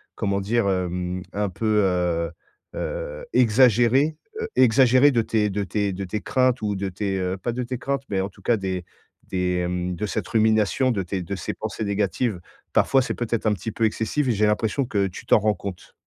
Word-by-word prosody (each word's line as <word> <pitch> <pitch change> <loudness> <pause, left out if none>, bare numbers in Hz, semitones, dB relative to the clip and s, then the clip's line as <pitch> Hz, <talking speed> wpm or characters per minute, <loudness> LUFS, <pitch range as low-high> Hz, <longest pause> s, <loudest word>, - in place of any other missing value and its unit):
comment 100 -1 -1
dire? 110 +2 +1
Hem, 90 -1 -2
un 105 -1 -1
peu, 105 +4 +1
heu 90 -3 0 0.5
heu, - - -4
exagéré 125 +5 +4 0.2
heu, 450 - -2
exagéré 130 +3 +6
de 120 - +2
tes 110 -2 0
de 100 +1 -2
tes 100 0 -1
de 100 - -4
tes 105 +4 -3
craintes 130 -2 +1
ou 105 -1 -1
de 95 0 -2
tes, 95 +1 -2
heu, 90 +1 -2
pas 120 +6 -3
de 125 +1 -2
tes 125 +1 -4
craintes, 140 +2 -2
mais 100 -2 0
en 95 - -1
tout 100 - -20
cas 120 - +2
des 95 -2 -3 0.5
des, 90 -1 0
hem, 90 0 -2
de 105 - -3
cette - - -3
rumination, 110 +1 +2
de 105 -5 -1
tes 90 +1 -3
de 100 +3 -4
ces 95 - -4
pensées 110 0 -4
négatives. 100 +1 -1 0.3
Parfois, 135 - +4
c'est 125 - -2
peut-être 115 -2 -2
un 105 - +3
petit 105 +3 -5
peu 115 - 0
excessif, 115 +6 0
j'ai 110 -2 +2
l'impression 110 +5 0
que 100 -5 0
tu 90 - -10
t'en - - +5
rends 105 +1 +2
compte. 95 -3 -8
105 Hz, 205 wpm, -24 LUFS, 95-120 Hz, 0.5 s, exagéré